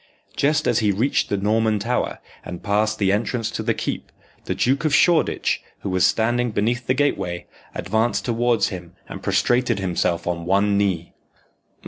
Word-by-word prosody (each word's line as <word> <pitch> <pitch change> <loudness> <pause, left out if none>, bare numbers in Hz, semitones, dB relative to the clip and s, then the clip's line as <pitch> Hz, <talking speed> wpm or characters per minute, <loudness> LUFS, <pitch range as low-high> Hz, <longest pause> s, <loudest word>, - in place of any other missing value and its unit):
Just 150 +2 +1
as 120 - +3
he 105 -2 +2
reached 115 +8 0
the 100 - 0
Norman 110 +2 +1
Tower, 120 +5 -1 0.3
and 90 0 -8
passed 105 +1 +1
the 95 -3 +2
entrance 115 +2 -1
to - - -3
the - - 0
keep, - - -4 0.3
the - - -2
Duke 135 +4 +1
of 155 -3 +2
Shoreditch, 170 -3 +2 0.2
who 100 - -3
was 95 -1 +4
standing 120 +2 +1
beneath 115 +3 -1
the 130 - +2
gateway, 90 -11 -1 0.3
advanced 110 +2 0
towards 120 -2 +1
him 90 -2 -8
and - - -8
prostrated 120 -2 +1
himself 90 -3 -1
on 85 -1 -3
one 100 +2 +3
knee. 95 -4 0
110 Hz, 165 wpm, -22 LUFS, 95-120 Hz, 0.3 s, was